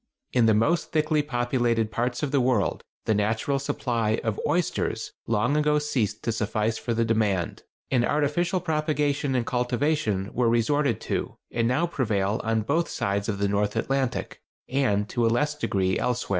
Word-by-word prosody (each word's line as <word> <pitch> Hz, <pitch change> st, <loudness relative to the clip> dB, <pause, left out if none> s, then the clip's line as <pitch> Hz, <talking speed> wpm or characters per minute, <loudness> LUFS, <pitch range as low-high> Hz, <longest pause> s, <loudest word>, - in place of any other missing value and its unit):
In 120 Hz, -2 st, +4 dB
the 110 Hz, -, +5 dB
most 155 Hz, +11 st, +1 dB
thickly 155 Hz, -1 st, +2 dB
populated 120 Hz, -4 st, 0 dB
parts 125 Hz, +4 st, -1 dB
of 145 Hz, -, -1 dB
the 140 Hz, -2 st, +3 dB
world 120 Hz, -10 st, +1 dB, 0.2 s
the 110 Hz, -, +2 dB
natural 110 Hz, +7 st, 0 dB
supply 115 Hz, -5 st, -1 dB
of 110 Hz, -3 st, -1 dB
oysters 175 Hz, 0 st, -1 dB, 0.2 s
long 115 Hz, +5 st, +1 dB
ago 150 Hz, 0 st, +3 dB
ceased 120 Hz, -8 st, -1 dB
to 115 Hz, -, 0 dB
suffice 110 Hz, 0 st, -1 dB
for 120 Hz, -, -2 dB
the 115 Hz, 0 st, +2 dB
demand, 105 Hz, -6 st, 0 dB, 0.3 s
and 125 Hz, -3 st, +3 dB
artificial 150 Hz, +7 st, +1 dB
propagation 150 Hz, -4 st, 0 dB
and 120 Hz, -2 st, +1 dB
cultivation 125 Hz, -5 st, 0 dB
were 120 Hz, -1 st, +2 dB
resorted 120 Hz, +1 st, +2 dB
to -, -, -3 dB, 0.2 s
and 115 Hz, -1 st, +1 dB
now 125 Hz, +8 st, +2 dB
prevail 110 Hz, -, 0 dB
on 110 Hz, -1 st, +1 dB
both 160 Hz, +9 st, 0 dB
sides 100 Hz, +1 st, -1 dB
of 100 Hz, -, -1 dB
the 100 Hz, 0 st, +1 dB
North 105 Hz, +1 st, 0 dB
Atlantic, 135 Hz, -2 st, -1 dB, 0.3 s
and 115 Hz, -7 st, +1 dB
to 120 Hz, -, 0 dB
a -, -, +4 dB
less 150 Hz, +6 st, +1 dB
degree 95 Hz, -11 st, 0 dB
elsewhere. 125 Hz, 0 st, -1 dB
120 Hz, 170 wpm, -26 LUFS, 110-145 Hz, 0.3 s, the